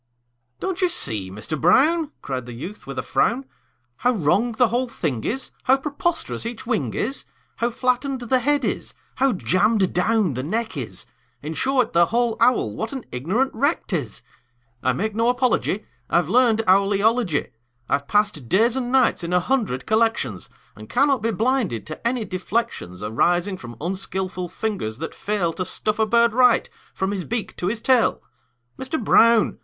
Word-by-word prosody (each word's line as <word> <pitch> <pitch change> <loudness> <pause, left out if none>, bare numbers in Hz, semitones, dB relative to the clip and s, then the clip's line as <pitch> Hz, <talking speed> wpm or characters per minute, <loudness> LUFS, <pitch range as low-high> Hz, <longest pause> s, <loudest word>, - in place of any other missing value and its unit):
"Don't 380 0 -3
you 365 - +3
see, 105 - -2
Mister 105 +11 -5
Brown," 295 - +3
Cried 130 -3 -4
the 120 - -7
youth, 175 - -8
with 135 -1 -6
a - - -1
frown, 235 - +1 0.5
"How 250 - +2
wrong 210 +5 +1
the 235 +1 +3
whole 245 +3 0
thing 140 - -3
is, 265 +4 -3
How 265 +1 +5
preposterous 300 +4 -2
each 230 0 -6
wing 145 - -1
is, 265 +6 -2 0.3
How 235 - +1
flattened 255 +2 -1
the 255 +2 +2
head 290 +4 +1
is, - - -3 0.2
how 270 0 +3
jammed 195 +2 +2
down 195 -2 +2
the 125 - -3
neck 220 - -2
is 110 -10 -6 0.4
In 155 +2 -4
short, 260 - +1
the 170 0 +5
whole 235 -1 +1
owl, 230 - +3
what 220 - -3
an 265 -3 -6
ignorant 190 - 0
wreck 285 +7 0
't 190 - -2
is! 125 -8 -5 0.6
I 130 - +2
make 215 +11 -2
no 230 +2 +2
apology; 245 -4 0 0.2
I've 175 -2 +2
learned 230 -1 +4
owl 195 +2 +4
eology. 205 - +1 0.4
I've 140 0 0
passed 205 - 0
days 225 +5 +3
and 250 -2 -2
nights 260 -9 +3
in 170 +1 -3
a 180 - +5
hundred 205 - -1
collections, 220 - 0 0.3
And 110 +1 -12
cannot 275 -1 +2
be 225 - 0
blinded 225 - 0
to 155 +9 -4
any 240 -2 -1
deflections 185 - -3
Arising 175 - +1
from 120 -5 -10
unskilful 185 +1 -3
fingers 185 - -3
that 160 +4 -5
fail 200 -5 -1
To 185 - -3
stuff 215 +3 -2
a 220 - +3
bird 235 0 +4
right, 250 -1 +4 0.2
from 190 +1 -2
his 195 -3 -3
beak 230 +2 -4
to 175 - -2
his 220 +3 -2
tail. 255 -2 +2 0.6
Mister 265 +4 -2
Brown! 230 -2 +4
215 Hz, 175 wpm, -23 LUFS, 170-245 Hz, 0.6 s, How